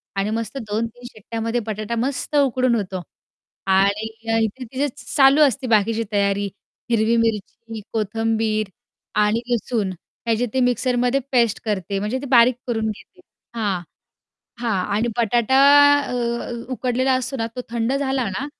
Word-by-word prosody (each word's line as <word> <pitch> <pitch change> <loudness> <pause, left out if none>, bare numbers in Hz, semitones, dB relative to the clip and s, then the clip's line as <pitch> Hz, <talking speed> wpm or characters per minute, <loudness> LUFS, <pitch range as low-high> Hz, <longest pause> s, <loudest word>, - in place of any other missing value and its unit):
आणि 195 +1 0
मस्त 225 +4 -3
2-3 230 +3 -3
शिट्ट्यामध्ये 230 +1 -3
बटाटा 215 +1 -3
मस्त 260 +4 -2
उकडून 255 -3 +2
होतो 190 -4 -3 0.7
आणि 200 +3 +2 0.4
इथे 220 +4 -3
तिचे 260 +4 -2 0.2
चालू 275 +1 +5
असते 265 -2 +1
बाकीची 225 0 +2
तयारी 200 0 +1 0.5
हिरवी 225 0 +3
मिरची, 225 0 -2
कोथंबीर, 220 0 0 0.5
आणि 210 +2 +2
लसूण 220 -3 -1 0.3
त्याचे 230 +1 +1
ते 260 - +1
मिक्सरमध्ये 250 +1 +1
पेस्ट 235 -4 +2
करते. 200 -2 -2
म्हणजे 210 +6 -2
ते - - -6
बारीक 245 -1 +6
करून 225 -2 -1
घेते. 215 - -10 0.4
हां, 205 -6 -1 0.8
हां. 220 -6 0
आणि 230 +3 +1
बटाटा 235 +3 +2 0.4
अ, 280 - -5 0.6
उकडलेला 255 +1 0
असतो 255 +1 -2
ना, 225 -2 -1
तो - - -2
थंड 235 +1 -1
झाला 265 -4 0
ना 255 +9 -3
230 Hz, 135 wpm, -21 LUFS, 215-250 Hz, 0.8 s, बारीक